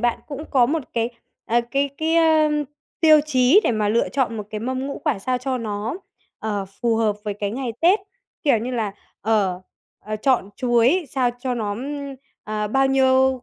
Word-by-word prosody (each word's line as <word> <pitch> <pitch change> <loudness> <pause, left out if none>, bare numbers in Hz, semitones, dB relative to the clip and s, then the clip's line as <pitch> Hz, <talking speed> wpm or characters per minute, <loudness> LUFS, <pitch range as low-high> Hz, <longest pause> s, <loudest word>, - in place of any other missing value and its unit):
bạn 240 0 +1
cũng 295 +1 -6
có 255 -4 +4
một 310 +4 -1
cái, 230 0 0 0.4
ờ, 235 +2 +2
cái 280 +2 +1
cái, 320 +1 +1
ơ, 320 -2 +4 0.5
tiêu 310 -2 +7
chí 260 +6 +5
để - - +3
mà 215 -2 0
lựa 230 +3 +2
chọn 255 -5 -1
một 210 - -3
cái 215 -1 -4
mâm 260 +3 -2
ngũ 280 - -5
quả 290 -9 +1
sao 250 +5 -1
cho 255 0 -2
nó, 215 0 -3 0.4
ờ, 205 -2 -2 0.2
phù 235 -2 +2
hợp 215 -2 +1
với 205 -1 -2
cái 205 0 -3
ngày 245 +1 -3
Tết, 365 +6 +4 0.4
kiểu 280 -6 +3
như 235 +4 -4
là, 225 -5 -2 0.3
ờ, 200 -4 +1 0.4
ờ, 215 +1 -4
chọn 235 -2 +1
chuối 250 +7 +3
sao 255 -3 +1
cho 250 0 -2
nó, 215 -4 -2
ưm, 280 +3 -5 0.3
ờ, 210 0 -2
bao 270 +5 +3
nhiêu 265 -1 +3
250 Hz, 195 wpm, -22 LUFS, 220-275 Hz, 0.5 s, tiêu